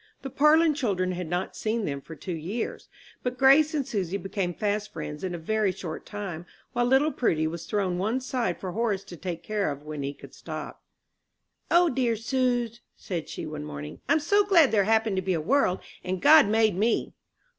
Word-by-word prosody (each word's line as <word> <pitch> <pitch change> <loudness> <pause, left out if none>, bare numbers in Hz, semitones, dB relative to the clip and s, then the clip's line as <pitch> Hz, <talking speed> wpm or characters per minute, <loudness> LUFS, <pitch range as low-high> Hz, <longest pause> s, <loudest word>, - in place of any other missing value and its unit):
The 270 - -5
Parlin 310 +3 +5
children 195 -10 0
had 180 -1 -4
not 180 +2 -2
seen 220 0 -1
them 140 -1 -3
for 160 - -10
two 175 +4 -5
years; 180 +9 -4 0.3
but 250 0 -3
Grace 280 +4 +5
and 280 -3 -1
Susy 195 -3 -2
became 195 -2 -2
fast 210 +3 -2
friends 150 -1 -6
in 180 -2 -2
a - - -4
very 210 +4 0
short 175 -3 -7
time, 185 -5 -6 0.3
while 240 0 +1
little 270 +5 +4
Prudy 160 - +1
was 165 +1 -4
thrown 190 -4 -1
one 220 +7 0
side 255 -2 -2
for 185 - -4
Horace 210 -1 -1
to 175 - -10
take 170 -1 -5
care 210 -4 -1
of 145 0 -6
when 150 -1 -6
he 140 +1 -4
could - - -14
stop. - - -7 0.9
"O 345 +1 +5
dear 245 -5 +1
suz," 240 0 -1
said 170 -4 -5
she, - - -5
one 75 - -6
morning, 75 0 -7
"I'm 315 - +4
so 405 +7 +3
glad 345 -8 +5
there 205 -3 +3
happened 220 -2 +2
to - - +1
be 185 -1 0
a - - -1
world, 210 - +2 0.2
and 185 0 -2
God 300 - +7
made 220 -2 +3
me!" 220 +5 0
205 Hz, 200 wpm, -27 LUFS, 175-250 Hz, 0.9 s, God